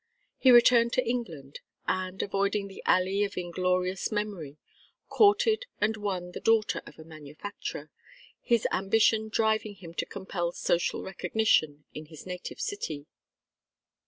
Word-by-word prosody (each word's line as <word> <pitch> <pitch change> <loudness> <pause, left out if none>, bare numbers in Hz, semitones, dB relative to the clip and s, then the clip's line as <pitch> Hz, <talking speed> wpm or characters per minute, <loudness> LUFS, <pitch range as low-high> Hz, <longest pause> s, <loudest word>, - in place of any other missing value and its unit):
He 260 - +5
returned 240 -1 +6
to 255 - +1
England, 165 - -4 0.3
and, 185 0 -2
avoiding 200 +1 0
the 195 - -11
alley 190 +2 +3
of 200 -1 -4
inglorious 180 +2 -1
memory, 200 -9 -4 0.5
courted 435 +3 +3
and 220 +1 +1
won 190 -4 -4
the - - -7
daughter 225 -1 +2
of - - -13
a 160 - -11
manufacturer, 155 0 -8 0.5
his 235 -2 +1
ambition 220 +3 +2
driving 220 -1 0
him 170 -4 -11
to - - -3
compel 175 -3 -4
social 175 - 0
recognition 180 -7 +1
in 155 0 -8
his 155 -1 -12
native 180 -1 -7
city. 155 - -4
195 Hz, 130 wpm, -28 LUFS, 175-220 Hz, 0.5 s, returned